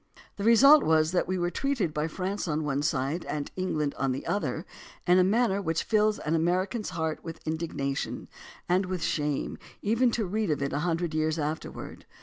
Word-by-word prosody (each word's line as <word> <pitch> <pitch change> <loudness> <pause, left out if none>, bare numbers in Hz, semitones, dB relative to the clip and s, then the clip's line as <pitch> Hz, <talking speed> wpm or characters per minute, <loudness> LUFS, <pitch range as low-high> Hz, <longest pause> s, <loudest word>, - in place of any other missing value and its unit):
The 200 - -4
result 275 +7 +7
was 160 0 +3
that 180 - +1
we 185 +1 -1
were 175 0 0
treated 250 - -1
by 150 +1 -1
France 190 +4 -3
on 155 0 -1
one 140 -1 -1
side 150 +2 -1
and 145 -1 -4
by 185 - -3
England 150 -6 -1
on 135 - +1
the 130 - -5
other 205 - -2 0.4
in 180 +1 +5
a - - +6
manner 200 0 +2
which 165 -3 -1
fills 215 -1 +2
an 155 - -2
American's 185 +7 0
heart 160 -1 -3
with 165 -1 -7
indignation 155 -4 -3 0.4
and 185 +2 +2
with 180 -3 -3
shame 150 -4 -1 0.2
even 230 +4 +3
to 230 -2 -1
read 210 +1 -1
of 150 - +1
it 140 - -2
a 140 - 0
hun 165 +1 0
dred 170 -2 -3
years 155 0 0
afterward. 155 +1 -5
170 Hz, 200 wpm, -28 LUFS, 155-200 Hz, 0.4 s, result